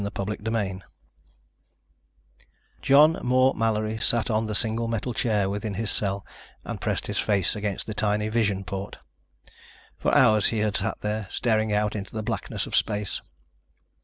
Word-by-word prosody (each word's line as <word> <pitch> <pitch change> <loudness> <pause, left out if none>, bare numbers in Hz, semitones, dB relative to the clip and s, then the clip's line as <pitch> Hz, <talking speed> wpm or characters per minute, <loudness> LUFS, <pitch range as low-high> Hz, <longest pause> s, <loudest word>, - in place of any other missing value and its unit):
CHAPTER 100 +1 -3
FIFTEEN 100 -4 -2 2.0
John 150 +4 +5
Moore 130 +2 +3
Mallory 110 -1 -1
sat 120 +1 +4
on 110 0 0
the 105 - -2
single 115 +1 0
metal 115 +2 -2
chair 105 -4 +1
within 100 +1 -3
his 110 +1 0
cell 100 -1 -1 0.4
and - - -6
pressed - - -1
his - - -2
face 100 -2 +1
against 105 -2 -3
the 110 - -5
tiny 105 0 0
vision 105 -4 0
port. 95 +2 -6 1.0
For - - +1
hours 110 -1 +5
he 115 - -1
had 105 -1 0
sat - - -3
there, 105 -1 -3
staring 110 -2 +1
out 105 0 0
into 100 +1 -6
the 110 - -3
blackness - - -3
of - - -4
space. 105 -1 0
105 Hz, 155 wpm, -25 LUFS, 100-115 Hz, 2.0 s, John